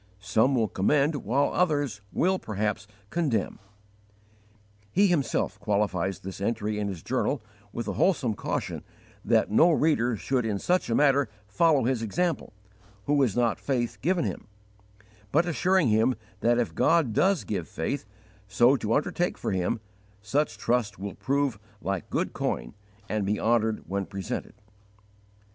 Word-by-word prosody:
Some 110 +7 +2
will 115 -3 +2
commend, 140 - +2
while 135 +4 0
others 145 - 0
will, 190 +1 +1
perhaps, 105 -1 -2 0.2
condemn. 140 - -1 1.3
He 200 +3 +4
himself 170 -8 0
qualifies 100 -3 0
this 95 +1 -7
entry 105 0 -1
in 105 - -1
his 95 -5 -6
journal 130 0 -1 0.3
with 120 -2 -5
a 100 - -1
wholesome 135 - +2
caution - - -3 0.4
that - - +2
no 160 +11 +6
reader 145 -7 +2
should 130 +4 0
in 110 -3 -1
such 180 - 0
a 115 - +1
matter 140 -4 +3 0.2
follow 140 +7 +3
his 125 -1 0
example, 170 - -1 0.5
who 145 0 +2
has 120 -7 +2
not 120 -2 +1
faith 120 -5 -2
given 175 +4 +1
him; - - -5 0.8
but 165 +5 +3
assuring 175 -1 +2
him 110 +4 +3 0.2
that 120 +1 +3
if 120 - 0
God 160 -9 +3
does 190 - +2
give 95 -6 -3
faith 110 - -3 0.4
so 120 +7 +4
to 110 -1 0
undertake 175 +4 0
for - - -3
Him, 95 +3 0 0.4
such 130 +2 0
trust 115 -2 0
will 100 +1 -5
prove 140 -5 -1 0.2
like 100 -5 -3
good - - -1
coin - - -2 0.3
and 105 0 -1
be 105 +2 0
honoured 110 -1 +1
when 100 0 -2
presented. 100 -2 -5
120 Hz, 150 wpm, -27 LUFS, 105-145 Hz, 1.3 s, no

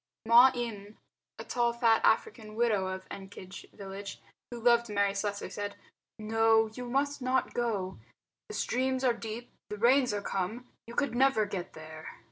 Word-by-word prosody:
Ma 240 +3 +8
Eme, 215 -4 -5 0.4
a - - -6
tall 240 -1 +1
fat 235 -1 +3
African 220 - +1
widow 220 -5 +2
of 190 0 -5
Ekenge 195 -1 -10
village, 200 0 -8 0.3
who 240 - -7
loved 235 0 +4
Mary 200 -1 +1
Slessor, 200 0 -3
said, 205 0 -4 0.4
"No, 225 0 +3
you 245 +1 -6
must 280 +2 0
not 255 +1 0
go. 210 -6 -2 0.5
The 425 - -6
streams 260 +1 0
are 250 -2 +4
deep; 230 +1 -7 0.2
the 210 - -5
rains 250 +3 +4
are 205 -1 -3
come. 210 +7 -3 0.2
You 235 - -9
could 280 -4 0
never 255 -3 +3
get 195 -4 -5
there." 155 0 -10
225 Hz, 160 wpm, -30 LUFS, 200-245 Hz, 0.5 s, Ma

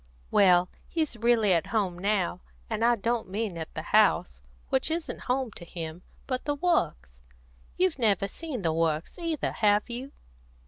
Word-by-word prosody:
"Well, 180 -2 +5 0.2
he's 315 -6 -1
really 225 -3 +3
at 165 -2 +1
home 190 -6 -1
now. 190 -2 0 0.3
And 220 0 -1
I 240 +1 +5
don't 230 -1 -1
mean 205 -1 -2
at 160 -1 -6
the - - -4
house, - - +3 0.3
which 265 +3 +1
isn't 325 +1 -3
home 255 -2 0
to 185 - -10
him, 165 -1 -7 0.2
but 255 -1 -3
the 290 - 0
Works. 170 - 0 0.6
You've 365 -6 +1
never 205 -4 +2
seen 270 -2 -6
the 165 -1 +1
Works 160 - -1
either, 330 -3 -1
have 210 +1 +2
you?" 255 +4 -5
215 Hz, 165 wpm, -28 LUFS, 175-255 Hz, 0.6 s, Well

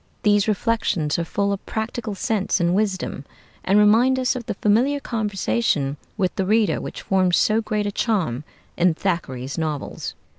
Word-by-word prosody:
These 205 0 +3
reflections 205 -8 0
are - - 0
full 200 +4 -1
of 195 - -5
practical 220 -1 -3
sense 200 0 0
and 175 0 +2
wisdom, 190 -7 -1 0.4
and 195 +2 +3
remind 225 +5 +5
us 255 -1 +1
of 240 -3 -6
the - - -2
familiar 240 +9 +2
conversation 205 - -1 0.2
with 185 -3 0
the 190 - +1
reader 210 -5 +2
which - - -7
forms 185 -2 +2
so 220 +1 +3
great 210 -1 -2
a 205 - -1
charm 180 - -1 0.3
in 175 -1 +3
Thackeray's 145 -7 -3
novels. 155 -3 -4
200 Hz, 160 wpm, -22 LUFS, 175-220 Hz, 0.4 s, remind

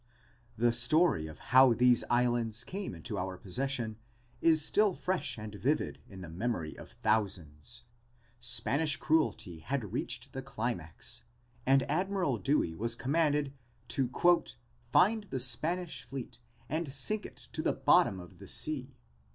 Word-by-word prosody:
The 120 +1 +3
story 120 - +4
of 80 - -10 0.2
how 130 -1 +8
these 125 0 +5
islands 120 -2 +1
came 190 - -5
into 80 - -4
our 95 0 -4
possession 115 +3 -2 0.4
is 160 -2 +5
still 205 -3 +3
fresh 185 -7 -1
and 105 -1 -7
vivid 130 +9 -1
in 95 -2 -10
the 90 - -7
memory 85 -2 -3
of - - -12
thousands. 105 0 -1 0.6
Spanish 130 +5 +1
cruelty 150 - 0
had 120 - -3
reached - - -2
the 135 - -4
climax 120 -4 -4 0.5
and 135 0 +5
Admiral 175 - 0
Dewey 100 - +1
was 115 +7 -1
commanded 145 +1 +1 0.4
to 130 -3 +1 0.8
"find 215 - +4
the 135 -9 -4
Spanish 160 +9 -1
fleet 130 -1 -8 0.3
and 160 -1 -2
sink 205 +11 0
it - - -18 0.2
to - - -2
the - - +1
bottom 95 - +4
of 90 -2 -12
the - - -11
sea." - - -1
125 Hz, 140 wpm, -31 LUFS, 110-150 Hz, 0.8 s, how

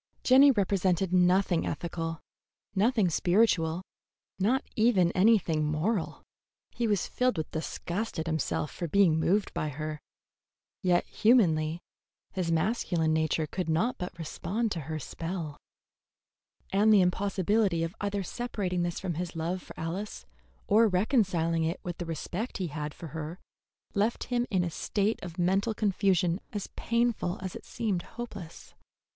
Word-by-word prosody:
Jenny 270 +3 +7
represented 190 -5 +1
nothing 180 -1 +3
ethical, 165 -1 -4 0.5
nothing 215 0 +3
spiritual, 175 -1 +2 0.6
not 235 +8 +2
even 210 -6 +4
anything 185 -6 +3
moral. 160 +6 -1 0.5
He 235 - -1
was 205 -5 +1
filled 250 -5 0
with 160 - -3
disgust 175 +6 -4
at 160 - -2
himself 155 -2 -1
for 170 - -4
being 170 -2 +4
moved 195 +5 +1
by 155 - -2
her, 155 +1 -5 0.8
yet 180 -1 +2
humanly 170 -8 +3 0.5
his 180 -3 -1
masculine 165 -2 +1
nature 160 0 +1
could 175 +2 -4
not 180 +11 +1
but 180 -1 -5
respond 195 +7 -2
to 170 - -2
her 155 - -2
spell; 165 0 -5 1.2
and 210 +3 +5
the 205 -3 +7
impossibility 190 0 +1
of 165 +1 -3
either 205 -1 -1
separating 195 -5 -2
this 175 0 -2
from 185 -2 -3
his 175 -1 -5
love 170 +3 -2
for - - -12
Alice 180 +6 -4 0.4
or 220 +3 +5
reconciling 180 - +1
it 165 +2 -1
with 175 -1 -5
the 175 - -4
respect 175 - -4
he 185 -3 -2
had 150 0 -5
for 165 - -8
her 160 +3 -5 0.6
left 210 +3 +1
him 240 0 +1
in 185 -3 +1
a 170 - -2
state 205 +6 -1
of 175 -2 -8
mental 195 +5 +1
confusion 190 -4 +2
as 205 -2 -3
painful 235 -6 0
as 185 - -5
it - - -9
seemed 205 -7 -2
hopeless. 205 -7 -9
180 Hz, 145 wpm, -29 LUFS, 165-205 Hz, 1.2 s, Jenny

